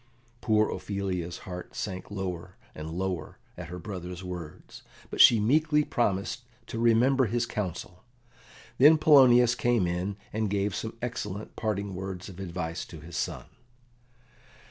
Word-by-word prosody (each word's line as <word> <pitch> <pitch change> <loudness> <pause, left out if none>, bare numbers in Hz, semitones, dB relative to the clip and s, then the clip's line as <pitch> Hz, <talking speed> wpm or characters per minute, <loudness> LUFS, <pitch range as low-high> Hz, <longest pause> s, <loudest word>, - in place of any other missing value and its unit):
Poor 110 -2 +3
Ophelia's 95 -4 -3
heart 90 -1 -8
sank 95 -3 -5
lower 90 -2 -5 0.2
and 80 0 -7
lower 90 -1 -3 0.2
at 90 -1 -7
her 90 +1 -7
brother's 90 -1 -7
words, 90 -4 -8 0.3
but - - +2
she 115 - +8
meekly 150 +7 +3
promised 105 -3 -1 0.2
to 115 - -5
remember 120 +3 +4
his 120 +2 0
counsel. 90 -5 -5 0.8
Then 150 +4 +8
Polonius 125 -6 +6
came 120 -6 +1
in 90 +3 -2 0.2
and 110 -1 0
gave 100 0 0
some 110 +3 -5
excellent 110 -4 -5
parting 100 -2 -2
words 95 0 -6
of 95 -1 -11
advice 85 -2 -4
to 80 - -11
his 80 +2 -10
son. - - -3
100 Hz, 140 wpm, -28 LUFS, 90-115 Hz, 0.8 s, she